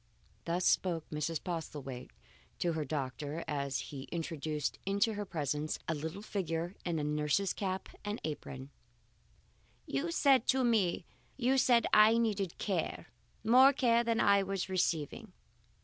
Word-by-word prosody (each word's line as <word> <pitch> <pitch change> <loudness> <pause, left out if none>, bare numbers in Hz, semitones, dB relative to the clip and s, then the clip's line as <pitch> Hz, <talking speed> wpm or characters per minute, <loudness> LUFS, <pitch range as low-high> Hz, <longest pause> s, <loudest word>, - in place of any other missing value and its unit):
Thus 175 +2 0
spoke 170 -4 +2
Mrs. 155 +1 -2
Postlethwaite 145 -7 -5 0.5
to 170 -1 0
her 160 -1 -1
doctor, 145 +2 -4
as 140 -2 -1
he 135 -2 -6
introduced 155 -3 -3
into 200 +3 +1
her 205 0 -4
presence 150 -3 -2
a 165 - +1
little 160 +6 -5
figure 175 -4 -3
in 170 -2 -1 0.2
nurse's 150 +6 +1
cap 190 -1 -3 0.2
and 205 +2 -3
apron. 140 -3 -6 1.1
"You 135 +5 -2
said 260 +7 +3 1.5
I 215 +2 +7
needed 205 -6 0
care, 190 -5 -2 0.3
more 255 +5 +7
care 235 -3 +3
than 230 -1 0
I 200 0 +5
was 195 -1 -3
receiving. 170 -5 -1
170 Hz, 120 wpm, -33 LUFS, 150-200 Hz, 1.5 s, I